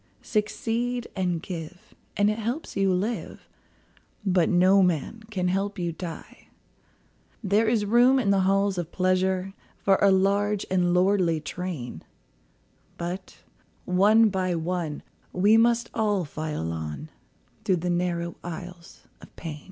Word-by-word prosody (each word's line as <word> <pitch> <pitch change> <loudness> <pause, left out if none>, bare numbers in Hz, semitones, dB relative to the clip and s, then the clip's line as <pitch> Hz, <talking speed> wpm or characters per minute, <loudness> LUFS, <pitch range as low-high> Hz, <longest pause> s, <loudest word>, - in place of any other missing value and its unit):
Succeed 235 +3 -1
and 180 -4 -1
give, 175 0 -8 0.2
and 205 +1 +3
it 215 - -4
helps 240 +8 -4
you 195 -1 +2
live, 205 +6 -3 0.8
But 180 -3 +3
no 185 +2 +5
man 180 +5 0
can 185 -4 -1
help 195 +3 -1
you 175 -2 -2
die. 165 0 -9 1.0
There 210 +3 +2
is 220 -2 +2
room 240 +5 +5
in 215 -7 +2
the 195 - +3
halls 195 0 +2
of 170 -1 -5
pleasure 185 +1 0 0.2
For 195 -1 +2
a 200 - +6
large 200 +2 +2
and 180 -1 +2
lordly 180 -3 +2
train, 155 -4 -6 1.0
But 180 +2 -6 0.4
one 210 +5 +5
by 185 -2 -1
one 165 -2 -3 0.3
we 200 +4 +4
must 235 +1 +3
all 210 -5 0
file 150 - -4
on 80 - -6 0.5
Through 195 -4 +2
the 180 - +1
narrow 175 -1 -1
aisles 175 0 -9
of - - -16
pain. 155 -3 -7
185 Hz, 135 wpm, -26 LUFS, 175-205 Hz, 1.0 s, a